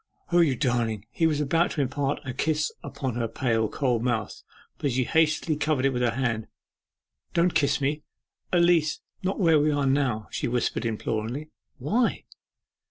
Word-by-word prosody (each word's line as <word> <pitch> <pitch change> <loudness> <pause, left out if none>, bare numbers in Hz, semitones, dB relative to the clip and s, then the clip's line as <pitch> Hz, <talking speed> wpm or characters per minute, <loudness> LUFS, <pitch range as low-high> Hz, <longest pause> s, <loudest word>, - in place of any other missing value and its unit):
'O, 175 - +4
you 155 -6 +4
darling!' 115 -4 0
He 165 - +2
was 150 -2 0
about 165 +4 +2
to 150 - 0
imprint 135 +1 -1
a 130 - -4
kiss 155 +3 0
upon 130 -3 -4
her 115 -1 0
pale, 115 -2 0
cold 125 -2 0
mouth, 115 -4 -2 0.4
but 140 - 0
she 130 +1 +1
hastily 155 +2 +2
covered 150 -3 0
it 135 - +2
with 125 - -1
her 120 -2 +1
hand. 115 -4 -1 0.9
'Don't 170 +1 +3
kiss 140 0 +2
me 145 +2 -1 0.5
at 175 -1 +4
least 165 -3 +2 0.2
where 180 -4 +3
we 150 +1 +3
are 145 -2 +1
now!' 135 -6 +1
she - - -2
whispered 120 0 -1
imploringly. 115 +6 -3 0.3
'Why? 215 - 0
140 Hz, 165 wpm, -26 LUFS, 120-155 Hz, 0.9 s, O